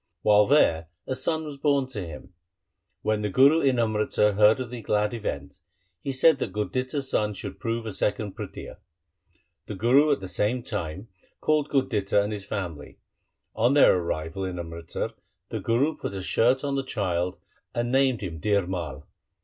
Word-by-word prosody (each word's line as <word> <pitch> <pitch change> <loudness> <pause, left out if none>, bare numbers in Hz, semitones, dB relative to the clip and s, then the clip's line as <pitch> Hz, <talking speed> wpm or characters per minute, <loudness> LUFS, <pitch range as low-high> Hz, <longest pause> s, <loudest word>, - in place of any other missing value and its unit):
While 105 0 +5
there 85 - +3 0.2
a - - -2
son 160 +5 -1
was 150 -2 -7
born 140 -1 +2
to 105 -7 -5
him. 85 +2 -10 0.7
When 110 0 +1
the 105 - -1
Guru 140 +9 +5
in 135 -2 +2
Amritsar 105 -2 +2
heard 105 +4 +5
of 125 -2 -5
the 120 -2 -6
glad 105 +1 0
event, 70 -11 -5 0.4
he 140 - -3
said 135 +2 +4
that - - -3
Gurditta's 130 +6 -2
son 105 -4 0
should - - -7
prove 115 -1 -2
a 110 - -4
second 105 0 -1
Prithia. - - -8 0.9
The 105 - -5
Guru 130 +9 +4
at 140 - +2
the 95 - -7
same 105 +7 -1
time 100 -3 -5 0.3
called 150 -1 +1
Gurditta 110 -8 +1
and 105 +1 0
his 100 -2 -6
family. 90 -8 -5 0.6
On 120 +5 +3
their 145 - +7
arrival 85 +2 -3
in 90 -1 -4
Amritsar 85 -1 -5 0.4
the - - -3
Guru 135 +7 +1
put 100 - -5
a 95 - -4
shirt 125 +7 +2
on 140 -1 -1
the 135 0 0
child 90 -7 -2 0.4
and 120 0 -1
named 130 -3 +2
him 85 -5 -5
Dhir 100 -1 +2
Mai. 85 -8 -4
110 Hz, 175 wpm, -26 LUFS, 95-130 Hz, 0.9 s, their